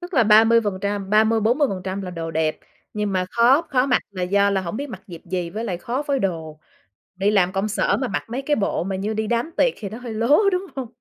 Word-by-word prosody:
tức 355 0 -8
là 235 -4 +4
ba 215 +1 +7
mươi 230 +1 +4
phần 205 -4 -3
trăm 200 -1 -3
ba 215 +1 +5
mươi, 225 0 +1
40% 200 -6 0
là 185 - -5
đồ 165 -1 -5
đẹp 160 -1 -1 0.4
nhưng 210 -1 -2
mà 185 -1 0
khó 245 +6 +4
khó 255 -1 +2
mặc 250 - +2
là 185 -2 -5
do 200 +2 +2
là 195 -1 +1
hổng 185 +3 -5
biết 285 +1 -4
mặc 195 -6 -9
dịp 170 -3 -10
gì 180 -2 -2
với 220 +6 -4
lại 185 -6 -2
khó 250 +8 -3
phối 280 -2 -1
đồ. 160 -7 -3 0.6
Đi 195 +3 +1
làm 185 -3 +3
công 195 +2 -1
sở 210 - +1
mà 260 - -2
mặc 200 - -3
mấy 250 +3 -3
cái 295 +2 0
bộ 200 - -1
mà 190 +1 -3
như 205 +3 -2
đi 220 0 -2
đám 240 +8 -1
tiệc - - +3
thì 205 - -6
nó 220 - -8
hơi 245 -2 -7
lố, 230 +7 +3
đúng 365 +2 -1
hông? 265 -3 -4
210 Hz, 275 wpm, -22 LUFS, 190-240 Hz, 0.6 s, ba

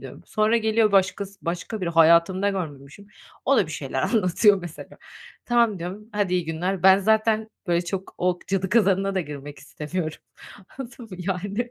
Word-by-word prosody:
diyorum. - - -11
Sonra 215 +2 +2
geliyor 220 -1 +2
başkası, 195 +1 +1
başka 180 +5 -4
biri 175 - -2
hayatımda 170 +4 +4
görmemişim. 155 0 -7 0.4
O - - +3
da - - +3
bir - - -8
şeyler - - -3
anlatıyor 205 -1 +3
mesela. 175 -2 -10 0.5
"Tamam" 235 -5 +2
diyorum, 190 +5 -7
"hadi 200 -3 0
iyi 180 -2 0
günler." 170 +3 -2
Ben 190 +1 +7
zaten 220 +1 +2 0.2
böyle 175 0 +1
çok 190 +2 -5
o 180 0 +1
cadı 190 0 -1
kazanına 195 -2 +2
da 190 - +1
girmek 145 -2 -8
istemiyorum. 155 +1 -5 0.6
Anladın 245 -2 -8
mı? 185 - -8
Yani... 200 +6 -3
190 Hz, 165 wpm, -24 LUFS, 175-210 Hz, 0.6 s, Ben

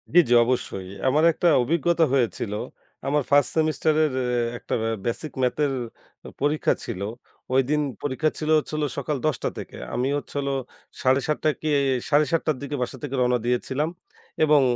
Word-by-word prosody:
জি, 175 - +8
জি, - - +4
অবশ্যই। 115 -6 -2 0.2
আমার 150 +4 +3
একটা 175 - 0 0.2
অভিজ্ঞতা 170 +4 +2
হয়েছিল, 120 -5 0 0.5
আমার 145 +1 +2
ফার্স্ট 145 -2 +4
সেমেস্টারের 155 -1 +2 0.5
একটা - - -3 0.3
বেসিক 125 +6 -2
ম্যাথের 140 +3 +1 0.7
পরীক্ষা 145 +2 +2
ছিল। 100 -5 -5 0.5
ঐদিন 135 +3 +2 0.2
পরীক্ষা 145 +3 +1
ছিল 155 - -3
হচ্ছিল 155 0 -2 0.2
সকাল 140 +1 -1
১০টা 150 -7 -1
থেকে। - - -8 0.2
আমি 125 +2 0
হচ্ছিল 140 -1 -4 0.5
৭:৩০ 135 +3 +1 0.2
কি 155 - -1 0.4
৭:৩০টার 155 0 +2
দিকে 140 +1 -4
বাসা 125 +2 -3
থেকে 140 -2 -3
রওনা 125 0 +3
দিয়েছিলাম 130 +5 0 0.6
এবং 150 -1 +5
145 Hz, 135 wpm, -24 LUFS, 130-155 Hz, 0.7 s, জি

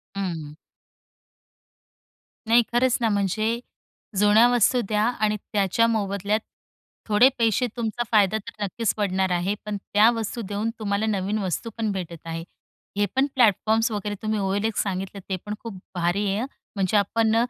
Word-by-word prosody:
हं. 165 -6 -4 1.9
नाही 235 +2 +6
खरंच 245 0 +3
ना, 230 - +2
म्हणजे, 215 +3 0 0.6
जुन्या 210 +3 +6
वस्तू 245 +1 +3
द्या 210 0 +1
आणि 215 -2 +1
त्याच्या 205 +2 +1
मोबदल्यात, 205 -1 0 0.7
थोडे 220 +4 +6
पैसे 230 +2 +2
तुमचा 235 0 -1
फायदा 210 -2 +4
तर 210 0 -7
नक्कीच 210 +2 -1
पडणार 190 -2 +1
आहे. 180 +3 0
पण 210 -1 -3
त्या 205 +3 +4
वस्तू 230 0 -3
देऊन 205 +2 -2
तुम्हाला 205 0 0
नवीन 205 -1 -1
वस्तू 195 +4 -2
पण 220 -2 0
भेटत 175 -4 -5
आहे. 165 0 -4 0.5
हे 205 - +3
पण 265 +1 +4
प्लॅटफॉर्म्स 225 -1 +3
वगैरे, 205 -1 -3
तुम्ही 215 -1 -1
OLX 200 +3 0
सांगितले, 195 0 -4
ते 190 - 0
पण 210 - -3
खूप 220 -5 -7 0.2
भारी 175 +4 0
आहे, 195 +1 0
हं. 255 - -2 0.3
म्हणजे 195 +1 +2
आपण 220 +2 +2
210 Hz, 150 wpm, -24 LUFS, 195-225 Hz, 1.9 s, नाही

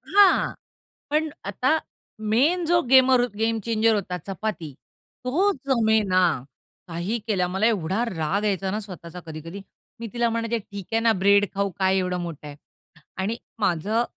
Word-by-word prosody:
हां, 405 -2 +5 0.6
पण 310 +1 +1 0.2
आता 255 +10 +1 0.5
मेन 320 +10 +3
जो 345 +1 +4
गेमर 260 -1 +6
हो 245 - +2
गेम 225 0 +1
चेंजर 225 -1 +2
होता 180 -3 -2
चपाती, 195 -5 -4 0.5
तो 370 +11 +2
जमेना 220 -7 +3 0.7
काही 175 +7 -2
केल्या. 185 -5 +1
मला 190 +4 +1
एवढा 200 0 +1
राग 185 +3 -1
यायचा 195 -2 0
ना 210 +2 -2
स्वतःचा 180 -3 -9
कधी-कधी. 165 +5 -8 0.4
मी 230 - -4
तिला 235 -1 +1
म्हणायचे 230 0 -1
ठीक 200 -3 -9
आहे 225 - +2
ना, 230 -1 +4
ब्रेड 200 +1 +4
खाऊ 200 0 0
काय 190 0 +2
एवढं 180 -1 -1
मोठं 165 -4 -7
आहे 145 - -10 0.7
आणि 215 +4 -1 0.2
माझं 205 +8 +1
210 Hz, 150 wpm, -24 LUFS, 185-235 Hz, 0.7 s, गेमर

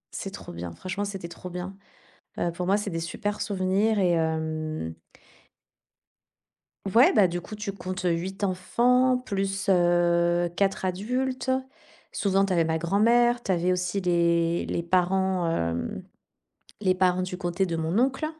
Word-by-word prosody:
C'est - - -4
trop - - -9
bien. 85 0 -6
Franchement, 195 +2 -4
c'était 195 -4 -6
trop 170 +1 -9
bien. 180 +2 -6 0.6
Heu, 175 - 0
pour 180 +1 -4
moi, 195 +2 +3
c'est 205 -1 -3
des 165 - -3
super 205 +5 -3
souvenirs 200 +2 +1
et 180 -2 +3
hem 160 - -2 2.0
Ouais, 240 +3 +6
bah 200 -5 +5
du 175 +1 -3
coup, 215 - -9
tu 210 -1 -4
comptes, 185 -1 -6
heu, 180 - +2
8 185 +4 -3
enfants 250 +7 +2
plus, 195 -5 -2
heu, 175 -1 +3
4 195 -1 +1
adultes. 250 +8 -2 0.6
Souvent, 195 -1 +1
tu 195 - -4
avais 170 -2 +3
ma 160 0 0
grand-mère, 235 +8 +3
tu 195 - 0
avais 175 +1 +1
aussi 180 +2 -1
les 170 -1 +2
les 170 - -2
parents, 185 0 +1
hem, 85 - -2 0.8
les 185 -3 +2
parents 185 0 +2
du 185 0 -3
côté 180 +1 -1
de 170 -2 -2
mon 165 +5 -1
oncle. 265 +4 +1
185 Hz, 155 wpm, -26 LUFS, 170-200 Hz, 2.0 s, Ouais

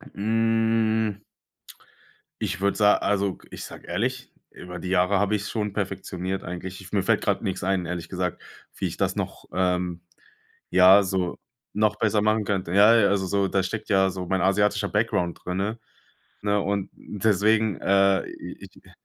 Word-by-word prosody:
Hm. 110 -1 +1 1.2
Ich 95 -4 -3
würd 100 0 +1
sa 105 -1 +5
also, 100 -2 0
ich - - -8
sage - - -11
ehrlich, - - -2 0.2
über 90 0 -9
die 90 +2 -5
Jahre 95 +1 +3
habe 105 +1 +1
ich 105 - -2
es 105 - -5
schon 105 -3 -2
perfektioniert 95 -1 -4
eigentlich. 90 +2 -7
Ich 95 - -13
mir 100 - +1
fällt - - +2
gerade - - 0
nix 95 -1 -3
ein, 95 -1 0
ehrlich 85 -2 -5
gesagt, 90 -2 -3 0.3
wie - - -3
ich - - -4
das - - 0
noch, - - -5
ähm, 90 -2 0 0.7
ja, 95 +2 +7
so 95 -2 -2 0.4
noch 105 0 +2
besser 105 -1 +2
machen 110 +1 +2
könnte. 95 -4 -2
Ja, 105 +3 +7
ja, 105 -3 +4
also 100 -1 +1
so 100 +1 +1
da 95 +1 0
steckt 110 +4 -5
ja 95 -2 +4
so 95 -1 -5
mein 95 0 0
asiatischer 105 +2 +2
Background 105 -5 0
drinne, 100 +5 -2 0.6
ne? 105 0 +1
Und 100 -1 -2
deswegen, 105 +1 +1
äh, 100 0 +3
ich - - -10
äh - - -18
100 Hz, 170 wpm, -25 LUFS, 95-105 Hz, 1.2 s, ja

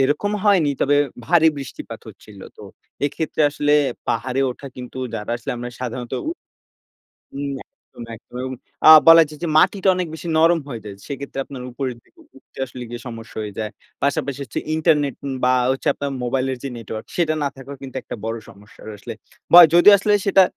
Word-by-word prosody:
এরকম 145 +10 +1
হয়নি 190 -8 +4
তবে 145 +1 +3 0.3
ভারী 160 0 +4
বৃষ্টিপাত 135 -3 -8
হচ্ছিল। - - -14 0.2
তো - - -13 0.4
এক্ষেত্রে 155 +2 -2
আসলে 145 0 0 0.4
পাহাড়ে 130 +3 -1
ওঠা 130 +3 -9
কিন্তু 125 0 -8 0.2
যারা 105 0 -5
আসলে 130 +3 -6
আমরা 120 +1 -5
সাধারণত 125 -1 -5 0.2
উ - - 0 1.1
উম 140 0 -3
একদম, 120 - -15
একদম। 120 - -18
এবং 130 0 -4 0.4
আ - - +11 0.2
বলা 165 0 +10
যায় 150 -1 -12
যে - - 0
মাটিটা 190 +3 +3
অনেক 180 -1 -2
বেশি 160 +2 -7
নরম 165 +1 +4
হয়ে 120 -6 -6
যায়। 100 -1 -7
সেক্ষেত্রে 140 -1 -6
আপনার 130 -3 -9
উপরের 130 -1 -4
দিকে 345 - -28 0.2
উঠতে - - -23
আসলে 125 -1 -9
গিয়ে, 120 0 -7
সমস্যা 115 -1 -9
হয়ে 105 -1 -6
যায়। 110 0 -3 0.3
পাশাপাশি 140 -1 -1
হচ্ছে 115 - -4 0.2
ইন্টারনেট 150 -4 +2
উম 135 - -3
বা 125 - +4 0.2
হচ্ছে 135 - -3
আপনার 140 -1 -4
মোবাইলের 130 +1 -1
যে 140 - -3
নেটওয়ার্ক 110 -1 -7
সেটা 165 -3 +2
না - - +1
থাকাও 135 +1 -9
কিন্তু 135 -1 -9
একটা 125 - -6
বড় 115 +1 -3
সমস্যার 105 +2 -16
আসলে। 100 - -8 0.4
বা 175 - +12
যদি 175 +4 +8
আসলে 210 +2 +1
সেটা 195 -1 +6
135 Hz, 185 wpm, -21 LUFS, 120-160 Hz, 1.1 s, বা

